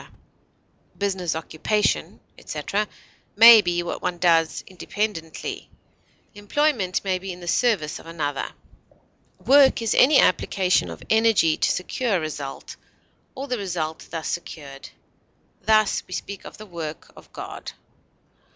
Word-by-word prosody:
Business, 190 -5 -1
occupation, 165 +6 -1
etc., 210 +1 -3 0.5
may 230 0 +10
be 175 -2 -1
what 175 - -5
one 180 -1 -2
does 165 -2 +2
independently; 185 -3 -5 0.6
employment 205 -2 0
may 190 -2 0
be 190 +1 -6
in 180 - -9
the 175 - -10
service 175 -6 +1
of - - -14
another. 150 -4 -3 0.9
Work 275 0 +6
is 225 - +1
any 280 +2 +6
application 185 +1 +2
of - - -9
energy 220 -8 +4
to - - +1
secure 215 +4 -1
a - - -1
result, 145 -3 -6 0.6
or 275 +1 -6
the 250 -3 -2
result 165 -5 -4
thus 165 -2 -5
secured; 140 -5 -7 0.7
thus, 215 -1 +3
we 185 - -5
speak 200 0 -7
of - - -10
the 215 - -10
work 165 -5 -7
of - - -16
God. - - -8
185 Hz, 130 wpm, -23 LUFS, 165-215 Hz, 0.9 s, may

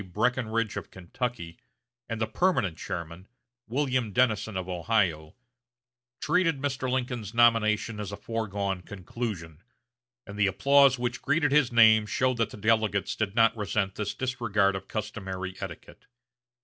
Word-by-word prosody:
Breckinridge 115 -2 0
of - - -6
Kentucky, 95 -1 -5 0.5
and 115 -1 -3
the 110 - +1
permanent 110 - +1
chairman, 85 +3 -6 0.4
William 130 -2 0
Dennison 110 -2 +1
of 95 -1 -4
Ohio, 90 -4 0 0.8
treated 165 0 +1
Mr. 135 -2 -2
Lincoln's 120 -4 -3
nomination 115 -2 +3
as 105 -1 -5
a 100 - -6
foregone 100 -4 -3
conclusion, 90 -4 -6 0.6
and 100 0 -9
the 100 - +4
applause 140 +6 +4
which 120 0 -3
greeted 145 0 +1
his 140 -4 +3
name 110 -2 +6
showed 130 +2 0
that 115 -2 0
the - - -10
delegates 110 -2 +1
did 105 -2 -2
not 115 -1 +4
resent 100 -2 -1
this 105 0 -4
disregard 110 -7 0
of 95 - -6
customary 95 -4 -5
etiquette. 95 -4 -9
110 Hz, 135 wpm, -27 LUFS, 95-125 Hz, 0.8 s, name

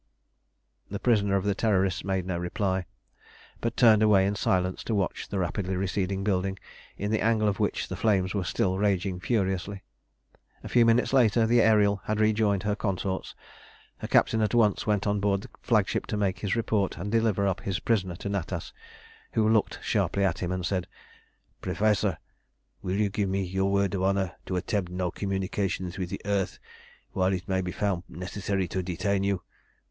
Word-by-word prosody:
The 100 - -3
prisoner 100 -4 +2
of 95 - +1
the 100 0 +1
Terrorists 95 -3 +1
made 95 -2 -1
no 90 -2 -2
reply, 95 +1 -1 0.7
but 115 - -3
turned 110 -3 +6
away 105 -3 +5
in 100 - +1
silence 90 -2 0
to 115 - 0
watch 95 -3 -2
the 100 - -4
rapidly 95 +1 -1
receding 95 +1 -1
building, 95 -1 0 0.4
in 105 +2 -2
the 110 - +1
angle 110 -1 +2
of 100 -2 0
which - - 0
the - - -5
flames 95 -4 +1
were 100 -3 -1
still 95 +2 0
raging 95 -2 0
furiously. 95 -1 -1 0.8
A - - -7
few 120 -2 +4
minutes 115 +3 +3
later 115 -3 +4
the 120 +1 +4
Ariel 105 -3 +4
had 110 0 -1
rejoined 110 -2 +2
her 105 -1 0
consorts. 95 -2 -3 0.6
Her - - -5
captain 110 - +3
at 110 +2 +1
once 110 -4 +2
went 105 -2 +1
on 105 0 +1
board 100 -1 +1
the - - -10
flagship - - +1
to 105 - -2
make 95 -3 0
his 100 +2 -1
report 110 -4 0
and 100 +4 -4
deliver 110 -3 +2
up 95 -2 0
his 95 -3 -2
prisoner 95 -6 0
to 85 - -6
Natas, 100 -4 -3 0.6
who 110 -1 +2
looked 110 -1 +2
sharply 100 - +1
at 95 -4 +1
him 90 -1 -2
and 90 -1 -2
said 90 -2 -1 0.7
"Professor, 100 0 +1 0.6
will 90 +1 -2
you 105 0 +1
give 100 -1 -1
me 95 +1 0
your 95 +2 0
word 100 -1 +1
of 95 - -1
honour 95 -1 0
to 95 - -2
attempt 90 0 -1
no 90 -1 -2
communication 95 -2 -2
with 90 -2 -3
the - - -5
earth 100 -2 -1 0.5
while 95 0 +1
it 90 0 -4
may 95 -1 +1
be 90 -1 -3
found 100 -3 -1
necessary 95 +2 -3
to 95 - -2
detain 95 +2 -1
you? 100 -2 -1
100 Hz, 185 wpm, -27 LUFS, 95-105 Hz, 0.8 s, turned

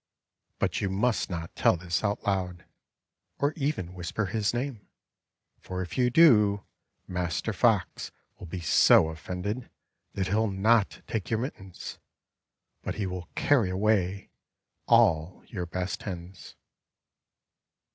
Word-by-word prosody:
But - - -1
you 100 - 0
must 105 +5 0
nqt 85 -2 -4
tell - - +3
this 90 +3 -2
out 105 0 -1
loud, 90 -3 -1 0.7
or 145 +1 +1
even 140 - -2
whisper 90 +4 -3
his 105 +2 0
name, 120 -3 -4 0.7
for 95 0 -4
if 90 - -8
you 125 -1 +3
do 105 -9 +5 0.4
Master 90 -3 -2
Fox - - +1 0.3
will 90 - -8
be 90 +2 -5
so 80 0 +5
offended 90 +9 -5 0.4
that 95 - -1
he'll 110 +2 +2
not 100 +2 +2
take 110 -4 -3
your 115 - +1
mittens; 95 -7 -6 0.8
but - - -4
he 105 - -2
will 90 -2 -5
carry 125 -10 +3
away 100 0 0 0.6
all 95 -8 +3
your 90 -2 -5
best 90 +2 -3
hens. 90 -1 -8
95 Hz, 125 wpm, -28 LUFS, 90-110 Hz, 0.8 s, do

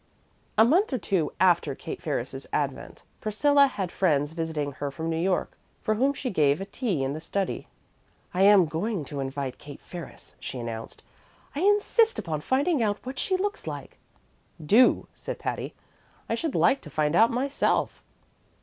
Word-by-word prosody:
A 220 - +7
month 345 - +3
or 260 - +1
two 185 -5 0
after 175 -2 +3
Kate - - -7
Ferris's - - -4
advent, - - -3 0.2
Priscilla 280 +7 +4
had 190 -9 -4
friends 150 -5 +1
visiting 160 -3 -3
her 140 +1 -4
from 160 +4 -4
New - - 0
York, 185 0 0 0.3
for 215 - +2
whom 260 +6 +2
she 260 -2 -3
gave 145 -5 +3
a 195 - -4
tea 200 - -2
in 135 +1 -1
the 155 - -6
study. 195 +3 -3 0.7
"I 180 - 0
am 200 -2 +7
going 165 +2 -2
to 145 0 -6
invite 135 -1 -4
Kate 145 -1 -10
Ferris," 175 -3 -10
she 130 - -6
announced. 115 -2 -6 0.5
"I - - -2
insist 415 +4 +3
upon 160 -6 -3
finding 280 - +1
out 205 -2 +1
what 260 +1 -5
she 375 - 0
looks 410 +2 -3
like." - - -7 0.6
"Do," 210 +11 +4
said - - -6
Patty. - - -4 0.5
"I - - -1
should 290 +6 -2
like 275 - +3
to 150 - -11
find 150 +1 0
out 225 +5 +6
myself." 270 +4 0
190 Hz, 170 wpm, -27 LUFS, -, 0.7 s, A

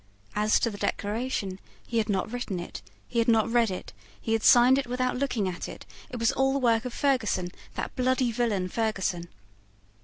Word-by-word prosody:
As 210 +1 +3
to 230 - +1
the 205 - -9
Declaration, 205 -3 -2 0.3
he 230 - 0
had 215 -1 -1
not 195 +1 0
written 225 -7 -3
it: 175 - -7 0.3
he 235 - -1
had 230 - +2
not 225 -1 +3
read 235 -2 +3
it: 185 - -6 0.3
he 225 - -2
had 225 - +1
signed 250 +3 +6
it 275 - -3
without 255 +1 -1
looking 250 -6 0
at 180 -1 -4
it: - - -10 0.2
it 250 - -6
was 230 +1 +2
all 270 0 +2
the - - +1
work 235 -3 +2
of 250 - -3
Ferguson, 225 -10 +1 0.3
that - - -4
bloody 255 -1 +1
villain 220 -6 0
Ferguson. 190 -5 -1
230 Hz, 195 wpm, -27 LUFS, 205-250 Hz, 0.3 s, signed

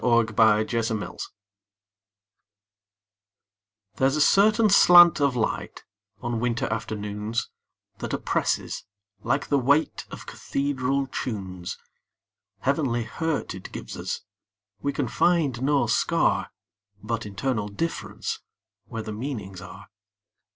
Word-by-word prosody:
Part 115 -2 +3
Two: - - -9
Nature 110 +1 +4
LXXXII 110 -2 -3 2.8
THERE'S 135 +1 +3
a 155 - +1
certain 215 +6 +5
slant 175 -4 +8
of 140 -3 +2
light, 115 -3 -2 0.4
On 120 -1 -1
winter 120 0 0
afternoons, 105 0 -3 0.5
That - - -4
oppresses, - - -1 0.4
like 135 +5 -1
the 140 - +3
weightOf 140 +5 0
cathedral 140 -1 -1
tunes. 95 -9 -5 0.8
Heavenly 135 -4 +1
hurt 160 +7 -2
it 95 0 -9
gives - - -7
us; - - -4 0.6
We 140 - 0
can - - -2
find 155 -9 +2
no 140 +1 +2
scar, - - +1 0.5
But 115 -2 -3
internal 105 +1 -2
differenceWhere 115 -3 -6
the 110 - -4
meanings 105 -6 -5
are. 90 0 -11
120 Hz, 105 wpm, -25 LUFS, 110-140 Hz, 2.8 s, slant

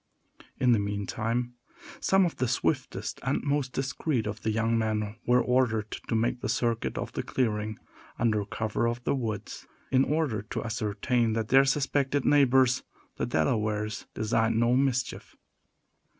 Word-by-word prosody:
In 125 -1 +4
the 115 - +4
meantime, 110 +4 -2 0.5
some 195 -1 +4
of 170 - -3
the 130 - 0
swiftest - - -1
and - - -1
most 140 -2 0
discreet 130 -1 -1
of 105 0 -4
the 110 - -1
young 115 +1 +1
men 110 -2 -1
were 125 +1 +4
ordered 115 -4 +1
to - - -4
make 120 +2 0
the 130 - -3
circuit 115 -1 0
of - - -4
the - - -2
clearing, 110 -4 -1 0.4
under 110 -3 +1
cover 110 +2 -1
of 120 +1 -3
the - - +1
woods, 110 -6 -4 0.2
in 130 0 +5
order 145 -9 0
to 105 - -5
ascertain 115 +1 0
that 110 -1 -2
their 135 +1 +6
suspected 140 0 +1
neighbors, 130 -3 +4 0.4
the - - -1
Delawares, 105 +5 -1
designed 110 +1 +1
no 120 +1 +3
mischief. 130 -2 -1
115 Hz, 150 wpm, -28 LUFS, 110-130 Hz, 0.5 s, their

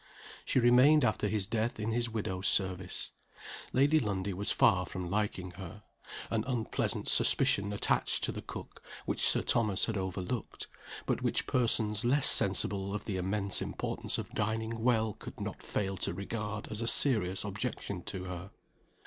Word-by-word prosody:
She - - -1
remained 125 +4 +5
after 110 -1 0
his 105 -2 -1
death 110 +2 -2
in 110 +2 -2
his 120 +1 0
widow's 100 -4 -3
service. 95 -2 -1 0.6
Lady 145 +4 +3
Lundie 100 -5 -2
was 100 +3 -4
far 90 0 +3
from 90 -2 -6
liking 100 -3 -2
her. 100 +3 -9 0.5
An 110 -2 0
unpleasant 120 -4 -2
suspicion 100 +1 +4
attached 105 - +1
to - - 0
the - - -7
cook, - - -10 0.2
which - - -2
Sir - - +4
Thomas 110 -5 +1
had 110 -2 -3
over 95 0 -3
looked, 110 +5 -5 0.4
but - - -1
which - - 0
persons 110 -4 +1
less 135 +4 +3
sensible 100 0 +4
of 105 - -6
the 100 -3 -3
immense 100 +1 -1
importance - - -3
of - - -6
dining 110 +1 -2
well 110 -3 +1
could - - -11
not - - -6
fail 95 -1 -3
to 85 - -3
regard 105 +2 -5
as 110 +1 -1
a 115 - -2
serious 105 -9 +4
objection 100 -2 -4
to 95 -2 -5
her. 90 +1 -7
105 Hz, 165 wpm, -31 LUFS, 95-115 Hz, 0.6 s, remained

